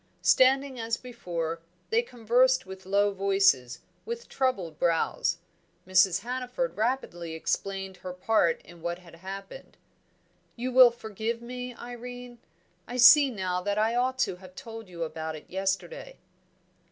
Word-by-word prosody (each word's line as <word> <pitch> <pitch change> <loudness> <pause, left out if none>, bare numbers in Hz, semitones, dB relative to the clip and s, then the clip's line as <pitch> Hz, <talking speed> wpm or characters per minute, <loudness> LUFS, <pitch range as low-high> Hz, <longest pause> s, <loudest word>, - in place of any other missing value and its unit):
Standing 265 0 +4
as 225 0 -1
before, 170 -9 -5 0.3
they 455 +1 +4
conversed 250 - +2
with 190 0 -10
low 200 +1 +2
voices, 195 -11 +2 0.2
with 470 +1 -6
troubled 195 - -1
brows. 165 -2 +1 0.5
Mrs. 185 -1 +4
Hannaford 255 - -3
rapidly 215 -8 -2
explained 195 +3 -3
her 180 0 -7
part 180 -2 +1
in 170 -1 -15
what 170 +1 -3
had 170 -2 -16
happened. 195 - -9 0.8
"You 250 +2 -3
will 255 -1 +9
forgive 225 0 -4
me, 250 +1 -7
Irene? 245 0 -9 0.5
I 245 - -5
see 270 +3 +8
now 185 -6 -2
that 205 +2 -1
I 220 +2 +2
ought 255 +2 0
to 180 - -6
have 185 0 -14
told 225 -2 -9
you 170 -2 -5
about 160 0 -5
it 155 - -11
yesterday." 195 - -3
215 Hz, 140 wpm, -28 LUFS, 180-250 Hz, 0.8 s, will